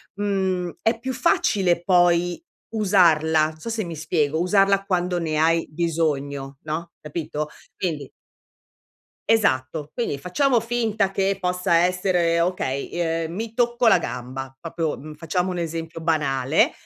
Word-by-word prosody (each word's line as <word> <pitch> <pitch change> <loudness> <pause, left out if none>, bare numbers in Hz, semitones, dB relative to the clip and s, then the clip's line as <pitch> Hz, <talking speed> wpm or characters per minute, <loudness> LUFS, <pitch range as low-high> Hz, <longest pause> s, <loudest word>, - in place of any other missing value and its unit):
mhmm 190 -3 -1
è 225 +1 +1
più 260 +3 -4
facile 210 - +2
poi 175 -1 +3 0.3
usarla, 165 -7 +4
non 155 0 -14
so 155 - -10
se 225 -1 -2
mi 170 -2 -6
spiego, 155 -1 0
usarla 195 +2 +3
quando 180 -2 0
ne 160 -3 -1
hai 165 +1 +2
bisogno, 145 -4 -2
no, 160 +2 -4
capito? 150 -1 -4 0.3
Quindi 155 -7 -3 1.2
Esatto. 150 -8 +1
Quindi 235 - -2
facciamo 240 - +2
finta 225 -3 0
che 195 0 0
possa 180 -2 +1
essere, 175 -1 +2
okay, 170 -7 -2
i 165 -1 0
uhm 165 - -8
mi 225 +2 -4
tocco 240 0 +2
la - - +6
gamba, 130 +2 -6
proprio, 165 0 -3
mhmm, 155 +3 -9
facciamo 165 +4 -2
un 180 - -3
esempio 165 0 -4
banale, 150 -3 +2
170 Hz, 140 wpm, -23 LUFS, 155-195 Hz, 1.2 s, la